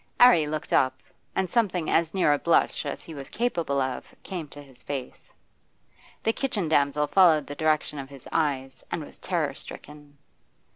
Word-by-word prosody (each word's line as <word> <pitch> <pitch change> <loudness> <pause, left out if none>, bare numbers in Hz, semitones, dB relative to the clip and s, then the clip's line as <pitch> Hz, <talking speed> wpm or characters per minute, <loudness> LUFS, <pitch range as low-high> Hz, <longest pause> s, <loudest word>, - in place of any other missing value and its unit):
'Arry 240 -12 +7
looked 155 0 -4
up, 130 0 +3 0.4
and 190 - +1
something 185 -5 +1
as 165 -1 +2
near 185 -6 +3
a 145 - 0
blush 170 - +2
as - - -5
he 165 - -9
was 140 -2 -8
capable 170 - -1
of 130 -1 -3
came 175 -5 -5
to 145 - -12
his 135 -3 -14
face. 135 -3 -6 0.9
The 225 - +2
kitchen 220 - -1
damsel 145 -1 +2
followed 160 -4 +5
the 145 - -6
direction 155 -1 0
of 135 -1 -7
his 140 -2 -11
eyes, 135 -4 -1
and - - -3
was - - -14
terror - - -1
stricken. 145 -1 -12
150 Hz, 175 wpm, -26 LUFS, 140-170 Hz, 0.9 s, Arry